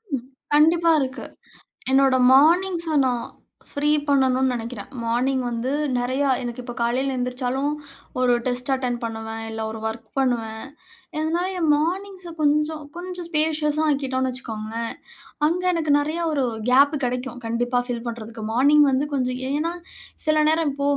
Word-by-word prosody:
ம், 245 -1 -6 0.3
கண்டிப்பா 330 +2 +5
இருக்கு. 260 0 -4 0.7
என்னோட 270 -1 +4 0.2
மார்னிங்ஸ 335 +2 +4
நான் 245 -2 -1 0.5
ஃப்ரீ 290 +1 0 0.2
பண்ணணுன்னு 265 -2 +3
நினைக்கிறேன். 235 +1 -6 0.2
மார்னிங் 255 +3 +1
வந்து 240 +2 -2 0.3
நிறையா 260 +3 0 0.2
எனக்கு 240 +1 -5
இப்ப 240 -1 -6
காலையில 260 +3 0
எந்திரிச்சாலும், 250 +3 -1 0.5
ஒரு 250 -1 +4
டெஸ்ட் 250 +2 0
அட்டெண்ட் 250 -2 -2
பண்ணுவேன், 225 0 -5
இல்ல 220 0 -5
ஒரு 220 - -7
வொர்க் 220 0 -4
பண்ணுவேன். 230 -2 -1 0.5
இதனால 330 +4 0
என் 320 -3 +1
மார்னிங்ஸ 365 +3 -3
கொஞ்சம், 300 +1 +1
கொஞ்சம் 355 -1 -5
ஸ்பேஷியஸா 305 -1 +1
ஆக்கிட்டோன்னு 260 -2 0
வச்சுக்கோங்களேன், 230 -2 -4 0.5
அங்க 360 +3 -1
எனக்கு 315 -3 0
நிறையா 310 +4 -1
ஒரு 280 -3 +1 0.3
கேப் 280 +4 +5
கிடைக்கும் 250 0 -3
கண்டிப்பா, 245 +2 0
ஃபில் 235 -1 -3
பண்றதுக்கு. 225 -1 -6
மார்னிங் 290 +5 +5
வந்து 275 +3 +1
கொஞ்சம் 255 -2 -1
ஏன்னா, 310 +4 -1 0.5
சில 310 0 +3
நேரம் 320 -2 +2
இப்போ 280 0 -1
265 Hz, 135 wpm, -23 LUFS, 245-305 Hz, 0.7 s, கண்டிப்பா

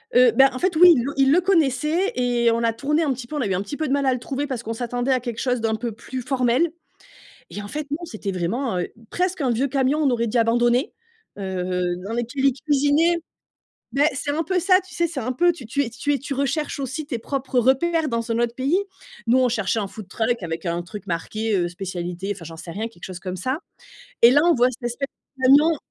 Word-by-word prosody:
Heu, 250 -1 +7
bah 270 +3 +6
en 255 - -5
fait, 370 -2 0
oui, 355 +3 +9
ils 240 - +1
le 280 - -3
ils 270 0 +4
le 350 - +5
connaissaient 330 0 +1
et 240 -2 +2
on 230 +1 0
a 230 - +3
tourné 300 +7 0
un 290 - +1
petit 245 -1 -8
peu, 305 - -6
on 290 - -1
a 230 - 0
eu 190 - 0
un 185 - -1
petit 245 - -6
peu 310 -2 -1
de 270 - 0
mal 280 -1 +1
à 260 - +3
le 250 - -3
trouver, 275 +3 -3
parce 260 -4 -3
qu'on 225 - -3
s'attendait 245 +2 -2
à 260 - +3
quelque 240 -2 -5
chose 250 -2 0
d'un 220 -1 +1
peu 235 +1 -4
plus 250 +4 -7
formel. 260 +5 +1 0.8
Et 205 - -6
en 205 - -8
fait, 300 +3 -4
non, 330 +4 -3
c'était 215 - -5
vraiment, 185 +4 -1
heu, 175 - -2 0.2
presque 365 -3 -1
un 255 - +1
vieux 255 +4 +1
camion, 270 +2 +1
on 285 -4 +3
aurait 235 -1 0
dit 235 +2 0
abandonné, 240 +3 +2 0.5
heu, 180 -2 -2
dans 220 - -4
lequel 240 +4 -1
ils 270 - +5
cuisinaient. 295 +4 +3 0.7
Ben, 285 +2 +3
c'est 285 +2 -3
un 320 +2 0
peu 370 +2 0
ça, 370 +1 +4
tu 370 - -15
sais, 340 - +1
c'est 310 -5 -5
un 250 +2 -2
peu 350 +7 +3
tu 315 -6 -11 0.2
es 240 - -3
tu 240 +5 -1
es 280 - 0
tu 275 +1 -5
recherches 280 +3 -1
aussi 275 +3 -4
tes 245 -6 -3
propres 260 +1 -2
repères, 315 +6 +2
dans 230 -1 -2
un 230 - +1
autre 235 0 0
pays. 275 +8 +1 0.5
Nous, 250 +3 +5
on 255 -1 +4
cherchait 220 -2 0
un 205 - -1
food 215 -2 -10
truck 230 +2 -1
avec 165 0 -4
un 170 0 -1
truc 205 +4 -9
marqué, 215 +6 -2
heu, 175 -1 +1
spécialités, 180 +1 -4
enfin, 170 - -11
j'en 165 0 -9
sais 170 - -8
rien, 220 +5 -3
quelque 175 -6 -14
chose 180 -2 -7
comme 185 0 -5
ça. 255 - -2 0.6
Et 235 - +9
là, 285 +3 +5
on 345 -1 +5
voit 250 0 +4
cette 240 -1 -5
espèce 275 +3 -4 0.3
de - - -9
camion 295 +5 +6
250 Hz, 255 wpm, -23 LUFS, 225-285 Hz, 0.8 s, oui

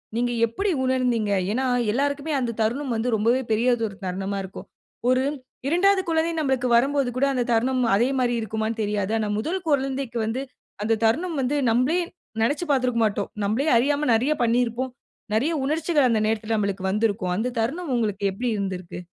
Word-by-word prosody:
நீங்க 240 +1 0
எப்டி 310 - -2
உணர்ந்தீங்க? 250 -5 +1 0.2
ஏன்னா 255 +5 0 0.3
எல்லாருக்குமே 285 +5 -1
அந்த 240 -2 -1
தருணம் 245 +4 0
வந்து 225 +2 -1
ரொம்பவே 235 +5 +2
பெரியதொரு 225 -2 +1
தருணமா 190 +2 -3
இருக்கும். 190 - -9 0.4
ஒரு 255 +1 +3 0.4
2வது 380 +5 +3
குழந்தை 325 0 +1
நம்பளக்கு 265 -4 0
வரும் 270 +5 +3
போது 275 -3 +1
கூட 270 - +3
அந்த 250 -2 +1
தருணம் 250 +3 +2
அதே 235 +5 +3
மாரி 245 -1 +1
இருக்குமான்னு 220 +1 -3
தெரியாது. 205 0 -1
ஆனா 215 -1 -1
முதல் 335 +12 -2
குழந்தைக்கு 270 -3 -1
வந்து, 225 +4 -2 0.4
அந்த 225 +1 +1
தருணம் 320 +10 +1
வந்து, 265 +3 0 0.2
நம்பளே 255 +9 +2 0.4
நினைச்சி 290 +8 0
பாத்துருக்க 250 -3 +1
மாட்டோம். 205 -1 -1 0.2
நம்பளே 225 +9 0
அறியாம 290 +4 +1
நிறைய 250 +7 +1
பண்ணியிருப்போம். 240 +2 0 0.4
நிறைய 280 +10 +1
உணர்ச்சிகள் 305 -1 +2
அந்த 225 -2 +2
நேரத்துல 220 0 -1
நம்பளுக்கு 200 -2 -2
வந்திருக்கும். 205 -3 0
அந்த 240 +5 -2
தருணம் 280 +8 -2
உங்களுக்கு 210 -3 -1
எப்டி 240 +6 -3
இருந்திருக்கு? 185 -3 -4
240 Hz, 160 wpm, -24 LUFS, 220-275 Hz, 0.4 s, ஒரு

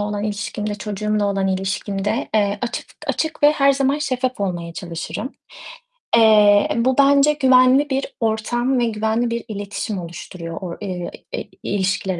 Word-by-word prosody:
olan 205 0 -2
ilişkimde, 205 0 -3
çocuğumla 210 0 -2
olan 195 -1 0
ilişkimde, 195 +4 -2
eee, 205 -1 +2
açık 240 - -3 0.2
açık 315 -2 -2
ve 295 +1 +7
her 275 -2 +4
zaman 275 +1 +1
şeffaf 255 -4 -2
olmaya 175 -3 -3
çalışırım. 170 - -5 0.9
Eee, 210 -2 +6
bu 250 +3 +1
bence 280 +1 +5
güvenli 260 0 +4
bir 270 0 0
ortam 240 +3 0
ve 240 - +2
güvenli 220 +2 0
bir 235 0 -3
iletişim 205 -1 -4
oluşturuyor 170 0 -8
o 175 -3 -6
eee, 180 -3 -4 0.5
ilişkiler 195 -2 -1
215 Hz, 140 wpm, -20 LUFS, 195-255 Hz, 0.9 s, ve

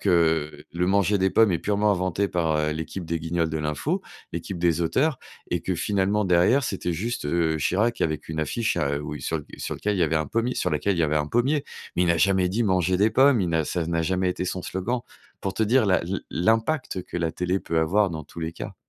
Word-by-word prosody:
que, 80 -5 +1
le 90 +1 0
manger 100 0 +3
des 95 0 +2
pommes 110 -4 +4
est 85 - +1
purement 105 0 +2
inventé 95 +2 0
par, 80 -4 0
heu, 75 0 0
l'équipe 80 +3 -5
des 85 0 -2
Guignols 85 0 0
de 80 0 -3
l'info, 75 -1 -2 0.3
l'équipe 95 - -5
des 85 -1 +2
auteurs 130 - +1 0.3
et - - 0
que - - -2
finalement 100 +1 +1
derrière, 95 +10 +4
c'était 90 -4 -2
juste, 110 +3 -3
heu, 80 0 +1
Chirac 105 +10 +1
avec 80 -1 -1
une 80 0 -2
affiche, 110 +6 -1
à, 70 -4 0
heu, - - -3
où 75 0 -5
sur 80 - -2
le 75 - -9
sur - - -4
lequel 105 0 -1
il - - -1
y - - +5
avait 80 0 +2
un 80 -1 0
pommier 115 - -1
sur - - 0
laquelle, 100 -3 0
il - - -3
y - - +4
avait 75 0 +1
un 75 -1 0
pommier, 135 +5 +1 0.3
mais 90 - +2
il 90 - +2
n'a 85 -1 +3
jamais 95 -1 +3
dit: 110 +6 0
«Manger 95 -2 +2
des 105 +3 +3
pommes», 130 -1 +5
il 90 - 0
n'a 80 -2 +1
ça 85 0 -2
n'a 85 -1 0
jamais 95 +2 0
été 90 - -3
son 90 0 -3
slogan. 115 +7 -2 0.4
Pour 95 - -3
te 110 - 0
dire 115 +1 +3
la 95 - +3
l'im 90 +3 -2
l'impact 110 - 0
que - - -7
la 85 -2 0
télé 90 +3 -1
peut 80 - -1
avoir 95 +5 +2
dans 80 -2 -6
tous 85 - -10
les 80 - -2
cas. - - -7
90 Hz, 250 wpm, -25 LUFS, 80-105 Hz, 0.4 s, y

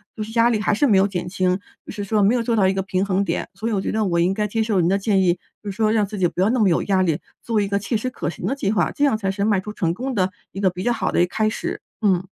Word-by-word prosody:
就 220 - -6
是 215 - -8
压 230 +1 +5
力 220 - +1
还 210 0 +1
是 255 - +2
没 225 -7 +4
有 195 - +4
减 180 -3 -4
轻， 185 0 0 0.2
就 - - -9
是 205 -1 -5
说 210 +1 +1
没 205 +5 +4
有 240 - 0
做 230 0 0
到 195 -4 +4
一 190 - +2
个 190 - -1
平 190 0 -1
衡 200 0 +1
点。 - - -2
所 215 +4 -4
以 - - -1
我 200 -3 0
觉 - - -2
得 215 0 0
我 170 -3 +1
应 175 +2 +3
该 210 +2 -1
接 225 +2 -1
受 215 -3 +1
您 170 - +3
的 195 +2 +2
建 195 -1 +2
议， 175 -2 +4 0.3
就 205 - -4
是 - - -10
说 215 0 +2
让 215 -2 +2
自 205 0 -7
己 180 - +3
不 175 - -7
要 195 - +3
那 250 - +1
么 210 -3 +4
有 165 - +2
压 190 -2 +2
力， 165 -5 +1 0.2
做 225 -2 0
一 200 - -1
个 200 0 0
切 220 +3 -1
实 255 +4 -3
可 - - -3
行 175 - -7
的 220 - 0
计 205 -8 -1
划， 215 - +1
这 285 - -2
样 270 -6 +2
才 195 -3 -1
是 200 +1 -2
迈 205 -2 +2
出 210 +3 -7
成 170 -4 -1
功 260 +6 -3
的 190 -4 +1 0.2
一 195 - -7
个 195 -1 +3
比 180 +1 -6
较 240 - +2
好 - - -1
的 - - +1
一 - - +5
个 - - -10
开 215 0 +2
始， 220 - -4 0.2
嗯。 190 -4 +2
200 Hz, 385 characters per minute, -22 LUFS, 190-220 Hz, 0.3 s, 压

